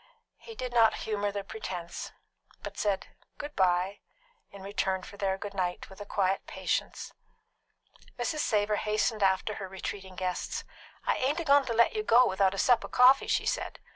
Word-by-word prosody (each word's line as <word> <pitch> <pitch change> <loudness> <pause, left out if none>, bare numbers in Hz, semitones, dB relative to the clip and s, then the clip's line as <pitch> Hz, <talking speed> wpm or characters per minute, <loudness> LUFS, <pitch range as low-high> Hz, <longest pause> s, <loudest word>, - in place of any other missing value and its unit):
He 455 - -11
did 250 - -5
not 230 -2 +5
humour 205 -2 -1
the 200 0 -4
pretence, 185 -4 -6 0.5
but - - -7
said 200 -2 -1 0.3
"Good 295 0 -7
bye" 185 +1 +2 0.5
in 200 -1 -12
return 190 -1 -1
for - - -10
their 195 -1 -1
"Good 200 +1 -7
night" 180 -1 -3
with 190 - -12
a 205 - -8
quiet 195 -1 0
patience. - - -3 1.0
Mrs. 305 +6 -2
Savor 210 -5 +1
hastened 215 +1 0
after 190 +2 +2
her 190 - -4
retreating 190 0 -6
guests. 180 0 -3 0.4
"I - - +1
ain't 280 +6 0
a - - -2
goin' 285 -2 +5
to 235 - -2
let 235 +1 +4
you 430 - -1
go 250 - +5
without 190 0 +2
a - - -7
sup 240 +4 +4
of - - -7
coffee," 255 +2 +6
she - - +1
said. - - -2
205 Hz, 180 wpm, -29 LUFS, 190-240 Hz, 1.0 s, coffee